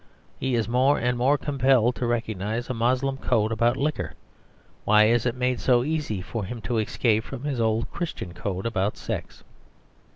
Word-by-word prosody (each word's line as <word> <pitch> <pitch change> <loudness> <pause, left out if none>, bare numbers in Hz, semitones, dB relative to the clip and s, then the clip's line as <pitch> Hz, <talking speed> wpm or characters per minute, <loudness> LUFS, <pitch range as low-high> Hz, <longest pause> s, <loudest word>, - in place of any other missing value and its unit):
He 130 -1 0
is 115 -2 0
more 130 +4 +3
and 125 +1 0
more 130 +4 +3
compelled 130 -4 +2
to 125 - -1
recognise 115 0 -2
a - - -1
Moslem 130 +3 0
code 110 -4 +1
about 115 +2 +2
liquor; 150 +2 -2 0.7
why 105 0 +5
is 115 +2 +3
it 120 - -1
made 125 -1 0
so 120 -2 +3
easy 140 -10 -2
for 110 +2 -4
him 115 +5 -5
to 120 -1 -1
escape 110 0 +1
from 120 - -8
his 140 -5 -1
old 110 +1 0
Christian 160 - -5
code 95 +2 -4
about 105 -3 -1
sex? - - -6
120 Hz, 175 wpm, -25 LUFS, 110-130 Hz, 0.7 s, why